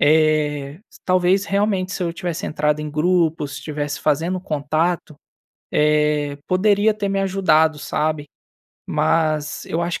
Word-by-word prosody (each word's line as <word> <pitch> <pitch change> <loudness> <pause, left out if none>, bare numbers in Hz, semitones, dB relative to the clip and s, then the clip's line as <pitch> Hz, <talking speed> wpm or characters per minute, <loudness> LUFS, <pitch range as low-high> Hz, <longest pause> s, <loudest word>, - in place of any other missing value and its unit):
eh, 150 -2 +2 0.2
s - - -17
talvez 185 +2 +2
realmente 200 -2 0
se 190 - -3
eu 170 -1 -1
tivesse 175 -2 -4
entrado 150 0 0
em 150 - -5
grupo, 165 0 +1
se 140 - -8
tivesse 145 -1 -4
fazendo 165 +5 0
contato, 155 0 -1 0.6
eh, 150 -1 +2
poderia 205 +3 +3
ter 205 -1 -3
me 195 0 0
ajudado, 160 -5 +2
sabe. 150 0 -2 0.6
Mas 155 -2 0
eu 165 +2 -1
acho 170 0 -2
160 Hz, 140 wpm, -21 LUFS, 150-185 Hz, 0.6 s, poderia